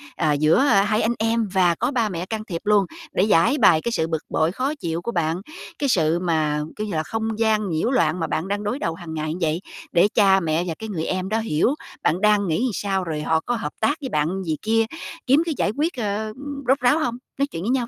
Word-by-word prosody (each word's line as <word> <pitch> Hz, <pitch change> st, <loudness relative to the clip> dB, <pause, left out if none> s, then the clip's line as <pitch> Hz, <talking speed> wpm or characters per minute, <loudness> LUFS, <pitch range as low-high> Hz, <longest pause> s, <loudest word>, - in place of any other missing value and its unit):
à, 155 Hz, -3 st, +1 dB
giữa 155 Hz, -, +3 dB
hai 215 Hz, -5 st, +3 dB
anh 230 Hz, +2 st, +1 dB
em 225 Hz, 0 st, +1 dB
và 180 Hz, -3 st, +3 dB
có 260 Hz, -, -1 dB
ba 230 Hz, -6 st, +1 dB
mẹ 175 Hz, -1 st, -4 dB
can 215 Hz, +2 st, -4 dB
thiệp 170 Hz, -5 st, -5 dB
luôn, 205 Hz, -2 st, +4 dB, 0.3 s
để 185 Hz, -, +3 dB
giãi 200 Hz, -, +4 dB
bày 175 Hz, -, +5 dB
cái 235 Hz, -, -2 dB
sự 160 Hz, -7 st, 0 dB
bực 160 Hz, -1 st, -3 dB
bội, 160 Hz, +1 st, +1 dB
khó 260 Hz, +9 st, -1 dB
chịu 170 Hz, -, -3 dB
của 235 Hz, -, -3 dB
bạn, 170 Hz, -1 st, -1 dB, 0.4 s
cái 280 Hz, -2 st, 0 dB
sự 165 Hz, -4 st, +2 dB
mà, 155 Hz, -4 st, 0 dB
kiểu 215 Hz, 0 st, -4 dB
như 200 Hz, -, -4 dB
là, 155 Hz, 0 st, 0 dB
không 220 Hz, +3 st, -3 dB
gian 215 Hz, -2 st, +2 dB
nhiễu 165 Hz, +8 st, 0 dB
loạn 170 Hz, -8 st, +2 dB
mà 165 Hz, -, -1 dB
bạn 160 Hz, +4 st, -2 dB
đang 205 Hz, +1 st, -2 dB
đối 210 Hz, +7 st, -2 dB
đầu 165 Hz, -, -1 dB
hàng 165 Hz, -1 st, -8 dB
ngày 155 Hz, 0 st, -2 dB
vậy, 165 Hz, +2 st, 0 dB, 0.3 s
để 175 Hz, +3 st, +5 dB
cha 195 Hz, -2 st, +5 dB
mẹ 165 Hz, -1 st, 0 dB
và 165 Hz, -, -2 dB
cái 220 Hz, 0 st, -6 dB
người 165 Hz, -5 st, -3 dB
em 185 Hz, 0 st, -2 dB
đó 220 Hz, +2 st, +1 dB
hiểu 220 Hz, -, +1 dB, 0.3 s
bạn 180 Hz, +5 st, +1 dB
đang 210 Hz, -2 st, +3 dB
nghĩ 220 Hz, +11 st, +1 dB
sao, 195 Hz, -1 st, -1 dB
rồi 155 Hz, -3 st, -3 dB
họ 160 Hz, +1 st, +1 dB
có 245 Hz, +8 st, -2 dB
hợp 205 Hz, -10 st, -4 dB
tác 290 Hz, +7 st, +1 dB
với 265 Hz, -, -4 dB
bạn 170 Hz, +6 st, -1 dB
gì 160 Hz, -3 st, -2 dB
kia 225 Hz, +1 st, +2 dB, 0.4 s
kiếm 275 Hz, +5 st, +5 dB
cái 330 Hz, -, -1 dB
giải 205 Hz, -, +1 dB
quyết, 320 Hz, +4 st, 0 dB
ờ, 215 Hz, -1 st, -2 dB, 0.3 s
rốt 270 Hz, +2 st, +4 dB
ráo 255 Hz, +5 st, +3 dB
hông? 240 Hz, -6 st, -1 dB, 0.2 s
Nói 280 Hz, -, +2 dB
chuyện 165 Hz, -10 st, -6 dB
với 215 Hz, -, -2 dB
nhau 250 Hz, -2 st, +1 dB
195 Hz, 250 wpm, -23 LUFS, 165-225 Hz, 0.4 s, bày